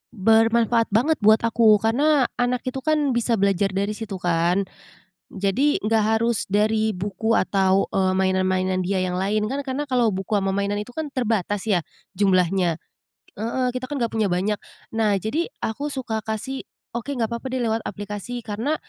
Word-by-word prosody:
bermanfaat 225 +2 +3
banget 290 +9 +3
buat 215 0 +5
aku. 230 -2 +5
Karena 270 +4 +3
anak 245 0 +1
itu 265 +1 -5
kan, 305 -2 +2
bisa 235 0 +1
belajar 195 0 +1
dari 200 +2 0
situ, 215 -4 -5
kan. 175 +2 +2 0.7
Jadi, 200 +10 +1
nggak 215 0 +2
harus 230 -1 0
dari 215 +2 +1
buku, 205 +4 -1
atau, 190 -1 +2
eee, 190 -1 +1
mainan-mainan 185 0 +1
dia 190 0 0
yang 180 0 -2
lain. 210 +3 0
Kan 280 +1 -3
karena 265 +2 -2
kalau 235 -5 +2
buku 190 0 -5
sama 195 0 -1
mainan 200 +1 -1
itu 225 +4 -7
kan, 315 -2 -4
terbatas, 215 -6 -1
ya 185 -6 +2 0.3
jumlahnya. 185 -3 +2 0.6
Heeh. 250 +3 -1
Kita 255 +1 -5
kan 290 - -4
nggak 235 -4 -1
punya 220 -2 +1
banyak. 195 +3 0 0.3
Nah, 220 -2 +2
jadi, 240 - -1 0.2
aku 285 +7 -2
suka 255 -6 -3
kasih, 225 +5 -4 0.2
"Oke, 255 +4 -4
nggak 230 -2 -1
papa 235 +3 -4
deh, 255 -1 -2
lewat 225 0 -1
aplikasi." 210 +4 -6
Karena, 230 +9 -2
220 Hz, 170 wpm, -23 LUFS, 195-240 Hz, 0.7 s, buat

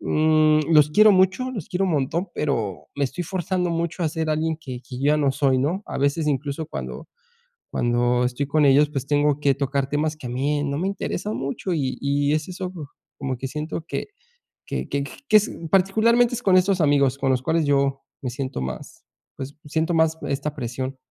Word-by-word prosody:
mm, 155 -1 +3
los 150 -1 +6
quiero 215 +6 +7
mucho, 190 +7 +2
los 220 -3 -6
quiero 190 0 0
un 175 - 0
montón, 155 +6 -1
pero 110 - -2
me 145 - +1
estoy 175 +7 -4
forzando 180 0 -1
mucho 170 +1 -2
a 160 - +2
ser 160 0 -2
alguien 160 +1 0
que 130 -4 -7
que 125 - -8
yo 140 - 0
ya - - +3
no 140 -2 +2
soy, 135 -1 +2
¿no? 160 +10 -1
A - - -5
veces 145 +3 +1
incluso 145 +2 -2
cuando - - -6 0.6
cuando 120 +1 +1
estoy 125 +3 -2
con 150 +2 +2
ellos, 145 +2 +5
pues 135 -1 -3
tengo 145 0 +2
que 140 -2 +3
tocar 140 -1 -1
temas 150 +2 0
que 130 - -7
a - - -5
mí 145 +3 0
no 140 -1 -2
me 190 - 0
interesan 200 +1 -3
mucho, 140 +7 -3
y 130 -5 -1
y 140 +1 +1
es 155 0 -1
eso, 180 0 -5 0.5
como 135 -2 -2
que 135 - -4
siento 155 +4 -5
que - - -4 0.6
que - - -4
que 140 0 -1
j - - -9 0.2
que 215 - +6
es, 210 - -1 0.2
particularmente, 225 +6 +3
es 245 - -5
con 185 -2 +4
esos 185 0 +3
amigos 140 -3 +3
con 135 -1 0
los 130 -1 +1
cuales 160 +2 +1
yo 140 -1 +1 0.2
me 130 - -2
siento 130 - -4
más 65 0 -7 0.3
pues, 140 +1 -7
siento 160 +3 0
más 160 0 +2
esta 140 +2 -2
presión. 130 +2 -4
150 Hz, 210 wpm, -23 LUFS, 135-170 Hz, 0.6 s, quiero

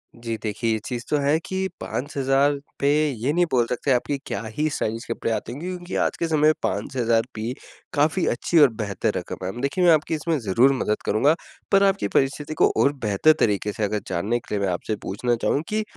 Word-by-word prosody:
जी, 115 -1 -4
देखिए 110 +1 -1
ये 110 - 0
चीज़ 120 -1 -4
तो 150 - +2
है 145 +2 +2
कि 190 0 -2
5,000 140 +1 +1 0.3
पे 140 - +1 0.2
ये 125 +2 -1
नहीं 175 +2 +3
बोल 120 -2 +3
सकते 130 +3 -1
आप 125 -2 +4
कि 145 - -1
क्या - - -3 0.2
ही 155 +1 +1
स्टाइलिश 115 -5 -3
कपड़े 115 - -2
आते 115 - -3
होंगे, 145 +8 -6
क्योंकि 180 -1 -5
आज - - 0
के 170 - -1
समय 160 -1 +1
में 155 +1 +6
5,000 115 +3 +1
भी 110 +3 -3 0.4
काफ़ी 155 +5 +2
अच्छी 165 +7 +2
और 145 -3 +8
बेहतर 110 0 -2
रकम 90 +1 -6
हैं। 95 +6 -4
देखिए 140 +7 0
मैं 175 - +7
आपकी 155 +1 +1
इसमें 160 +1 -1
ज़रूर 120 +5 +3
मदद 110 -5 -1
करूँगा, 140 +9 +3 0.4
पर 195 -1 +5
आपकी 195 - +2
परिस्थिति 140 +6 0
को - - +6
और 140 - +3
बेहतर 105 +10 +4
तरीके 105 -1 +1
से 110 - -3
अगर 105 0 -1
जानने 100 +7 -1
के 105 - -5
लिए - - 0
मैं 95 - 0
आपसे 105 +5 -3
पूछना 120 +5 -1
चाहूँ, 145 - +1
कि 215 0 0
125 Hz, 220 wpm, -23 LUFS, 110-150 Hz, 0.4 s, और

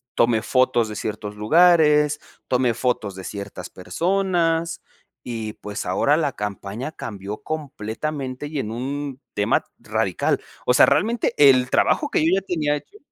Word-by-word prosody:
tomé 115 -1 +3
fotos 130 -2 +2
de 105 - -7
ciertos 105 -1 -5
lugares, 150 +3 +4 0.3
tomé 125 -2 +2
fotos 115 -5 -1
de 95 -1 -8
ciertas 100 -3 -7
personas, 170 - 0 0.4
y 115 -3 -5
pues, 105 0 -6
ahora 100 +11 +2
la 150 -3 0
campaña 105 +6 -5
cambió 100 -1 -7
completamente 140 -1 -4
y 150 -2 -4
en 110 -3 -3
un 135 +2 -4
tema 105 - +1
radical. - - 0 0.3
O 125 - +4
sea, - - +7
realmente 220 +11 +1
el 130 -3 +6
trabajo 290 - +2
que - - +1
yo 165 - +3
ya - - -15
tenía 155 -6 0
hecho 405 - -14
130 Hz, 145 wpm, -22 LUFS, 110-155 Hz, 0.4 s, sea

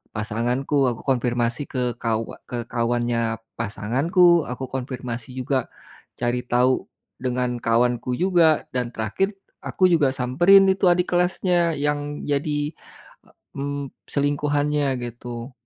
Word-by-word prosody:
pasanganku 120 +6 0
aku 120 - -5
konfirmasi 120 0 0
ke 125 -2 -2
kawa 115 -1 -2
ke 120 -1 -4
kawannya 115 -1 0 0.2
pasanganku 145 - +3
aku 125 +2 -4
konfirmasi 125 -2 -5
juga, 130 -1 -1 0.5
cari 120 0 0
tahu, 125 +2 +2 0.3
dengan 125 -1 -1
kawanku 120 +2 +1
juga 175 -4 +3
dan 125 -2 -1
terakhir 110 - -1 0.3
aku 185 - +2
juga 150 -6 +3
samperin 175 +11 +5
itu 190 0 0
adik 180 +1 +1
kelasnya 175 -1 +2
yang 145 0 -2
jadi, 145 +1 -1 0.8
mmm, 140 0 -4 0.2
selingkuhannya 145 0 +1 0.2
gitu, 120 +1 -8
130 Hz, 110 wpm, -23 LUFS, 120-150 Hz, 0.8 s, samperin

